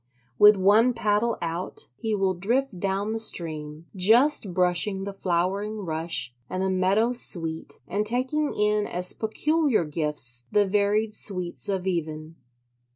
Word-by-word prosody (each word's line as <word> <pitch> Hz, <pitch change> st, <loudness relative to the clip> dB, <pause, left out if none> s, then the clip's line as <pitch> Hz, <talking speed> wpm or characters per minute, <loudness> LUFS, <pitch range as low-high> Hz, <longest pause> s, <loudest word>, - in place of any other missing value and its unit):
With 210 Hz, 0 st, +7 dB
one 215 Hz, +6 st, +4 dB
paddle 225 Hz, +1 st, 0 dB
out 170 Hz, +2 st, -4 dB
he 220 Hz, -, -2 dB
will 195 Hz, -2 st, 0 dB
drift 220 Hz, +3 st, -2 dB
down 195 Hz, +2 st, -2 dB
the 225 Hz, -, -3 dB
stream: 155 Hz, -6 st, -2 dB
just 225 Hz, +4 st, +4 dB
brushing 180 Hz, +2 st, +1 dB
the 200 Hz, 0 st, -5 dB
flowering 195 Hz, +3 st, -2 dB
rush 160 Hz, -6 st, -2 dB, 0.2 s
and 185 Hz, +1 st, -3 dB
the 190 Hz, -, 0 dB
meadow 195 Hz, +5 st, +1 dB
sweet 165 Hz, -9 st, -1 dB
and 200 Hz, +4 st, -1 dB
taking 260 Hz, +7 st, 0 dB
in 210 Hz, 0 st, +1 dB
as 180 Hz, +1 st, -1 dB
peculiar 285 Hz, -, 0 dB
gifts 150 Hz, -6 st, +2 dB
the 205 Hz, -1 st, +3 dB
varied 210 Hz, +2 st, 0 dB
sweets 185 Hz, -1 st, -4 dB
of 190 Hz, -2 st, -2 dB
even. 160 Hz, -3 st, -4 dB
195 Hz, 140 wpm, -25 LUFS, 175-215 Hz, 0.2 s, With